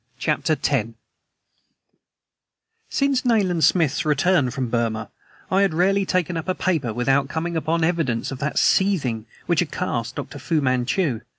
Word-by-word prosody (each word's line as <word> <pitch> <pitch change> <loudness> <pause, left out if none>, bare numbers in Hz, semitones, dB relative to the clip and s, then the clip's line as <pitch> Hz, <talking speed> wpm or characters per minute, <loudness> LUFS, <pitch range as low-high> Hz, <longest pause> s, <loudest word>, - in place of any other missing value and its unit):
CHAPTER 155 +4 0
X 125 -6 +1 2.0
SINCE 275 -2 +1
Nayland 195 -9 +2
Smith's 150 -6 +3
return 150 -1 +2
from 130 +1 -3
Burma 115 -2 -1 0.4
I 190 +1 +3
had 195 -5 +1
rarely 195 +3 +2
taken 180 -2 0
up 165 - -5
a 185 - +1
paper 160 -11 0
without 135 +4 +1
coming 165 +3 -3
upon 160 +1 0
evidences 160 -10 0
of 135 - -6
that 150 +3 -2
seething 135 - +2 0.2
which 175 -2 +1
had 175 - 0
cast 115 -11 -3
up - - -5
Dr. 145 - -8
Fu 160 +4 0
Manchu. 130 - 0
155 Hz, 155 wpm, -22 LUFS, 130-180 Hz, 2.0 s, Smith's